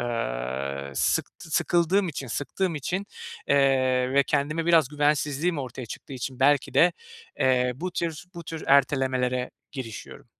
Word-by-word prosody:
eee, 70 - -3
sıktı 160 - -1
sıkıldığım 175 +4 +2
için, 140 -3 -5
sıktığım 165 - -2
için, 185 +7 -3 0.4
eee, 130 -2 +3
ve 140 0 +5
kendime 150 +3 0
biraz 165 -6 +5
güvensizliğim 150 +2 +1
ortaya 130 -2 -6
çıktığı 135 - -9
için 130 0 -5
belki 145 0 +3
de, 175 +1 +6 0.5
eee, 125 -1 +3
bu 180 +5 -4
tür 165 -2 -3
bu 170 -1 -8
tür 160 0 -6
ertelemelere 130 -2 +2 0.2
girişiyorum. 120 -6 -8
140 Hz, 135 wpm, -26 LUFS, 125-160 Hz, 0.5 s, de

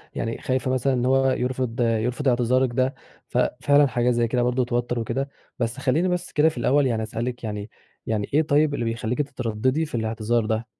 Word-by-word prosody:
يعني 115 0 -2
خايفة 130 0 -1
مثلًا 130 +1 +1
إن 125 -1 0
هو 135 +1 +3
يرفض 125 -1 -2
يرفض 120 +4 0
إعتذارِك 125 +1 +3
ده. 130 +2 +1 0.3
ففعلًا 145 +3 +3
حاجة 125 -1 +1
زي 120 -1 +1
كده 120 +1 0
برضه 125 +1 +1
توتر 120 0 -1
وكده. 130 +5 -2 0.3
بس 120 +1 -1
خليني 140 +7 +1
بس 180 -1 -2
كده 155 +2 +4
في 155 - -11
الأول 135 +4 +3
يعني 115 -3 -1
أسألِك، 120 +3 -4
يعني 105 -1 -4 0.4
يعني 110 -2 -2
إيه 150 - +5
طيب 150 0 +2
اللي 120 - -2
بيخليكِ 115 +3 -1
تترددي 130 +2 -1
في 150 - -7
الإعتذار 110 0 0
ده؟ 110 +1 -1
125 Hz, 190 wpm, -24 LUFS, 115-135 Hz, 0.4 s, إيه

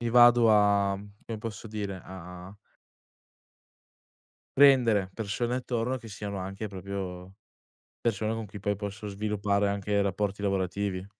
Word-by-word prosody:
mi 120 - 0
vado 120 -1 +7
a, 100 -2 +4 0.3
come 115 -1 -4
posso 110 0 -6
dire 100 -3 -4
a 90 +1 -10 2.0
prendere 120 -9 +6
persone 115 +4 -2
attorno, 125 0 -1
che 120 - -11
siano 100 -1 -5
anche 95 +3 -5
proprio 95 -1 -6 0.7
persone 110 -1 0
con 115 -1 -4
cui 100 +1 -9
poi 100 +1 0
possono 105 +1 -6
sviluppare 100 0 0
anche 100 0 0
rapporti 100 +1 -1
lavorativi. 95 -1 -1
100 Hz, 125 wpm, -28 LUFS, 95-110 Hz, 2.0 s, vado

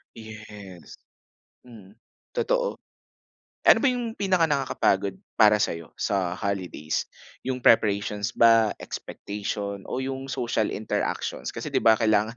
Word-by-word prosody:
Yes. 105 -5 -11 0.7
Mm, 110 -4 -15 0.4
totoo. - - 0 0.9
Eh - - +9
ano - - +1
ba 280 - +3
yung 245 -2 -2
pinakanakakapagod 145 - +1 0.2
para 105 0 +7
sayo 85 -5 -3
sa 95 -3 -1
holidays? 90 -6 -3 0.4
Yung 125 -1 -3
preparations 105 -2 +3
ba, 115 -2 +5
expectation, 100 -1 -5
o 130 +1 -2
yung 135 0 -5
social 120 -4 -1
interactions? 110 - -3
Kasi, - - -6
'di - - +2
ba 110 -1 +5
kailangan 110 0 +1
110 Hz, 115 wpm, -25 LUFS, 100-130 Hz, 0.9 s, Eh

